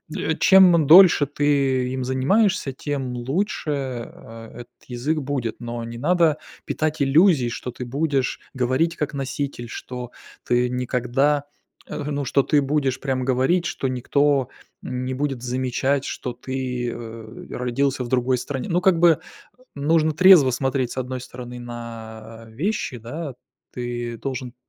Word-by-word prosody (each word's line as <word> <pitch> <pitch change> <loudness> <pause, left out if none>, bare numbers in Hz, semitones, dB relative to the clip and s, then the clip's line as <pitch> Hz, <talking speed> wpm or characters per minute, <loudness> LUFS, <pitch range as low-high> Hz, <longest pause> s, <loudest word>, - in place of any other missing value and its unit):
м, 160 - -1
чем 180 -5 +6
дольше 170 -1 +8
ты 140 -3 +1
им 130 0 -3
занимаешься, 140 - +1
тем 135 -2 -4
лучше, 150 +7 -2
э, 120 -4 -7
этот 120 -1 -13
язык 130 +6 -2
будет. 130 -5 -3
Но 120 -1 -5
не 115 0 -7
надо 160 +2 +2 0.3
питать 155 0 -2
иллюзий, 140 -2 +4
что 125 +1 -5
ты 125 - -7
будешь 135 0 -1
говорить 130 +6 0
как 150 -2 -3
носитель, 135 -2 -4
что 125 -1 -7 0.3
ты 125 0 +1
никогда 125 +3 0 0.4
э, 150 - -4
ну, 145 -1 -2
что 140 +2 +2
ты 150 +1 +3
будешь 135 -2 0
прям 130 -2 -2
говорить, 130 +8 +2
что 170 -6 -2
никто 135 +1 +1 0.3
не 125 +1 -4
будет 135 -2 -2
замечать, 130 +2 -1
что 125 -3 -5
ты, 125 -1 -4
э, 115 -1 -9
родился 130 +2 -1
в 120 - -7
другой 125 0 +1
стране. 130 +1 -4
Ну, 175 +1 +1
как 180 -2 +3
бы, 170 -2 +5 0.6
нужно 155 +2 +2
трезво 170 -4 +7
смотреть, 130 -1 -1
с - - -10
одной 130 0 -3
стороны, 125 0 -9
на, 115 -2 -9
а, - - -16
вещи, 145 - -2
да: 135 +5 -6 0.4
ты 120 -1 -4
должен 130 -1 -5
130 Hz, 145 wpm, -23 LUFS, 125-145 Hz, 0.6 s, дольше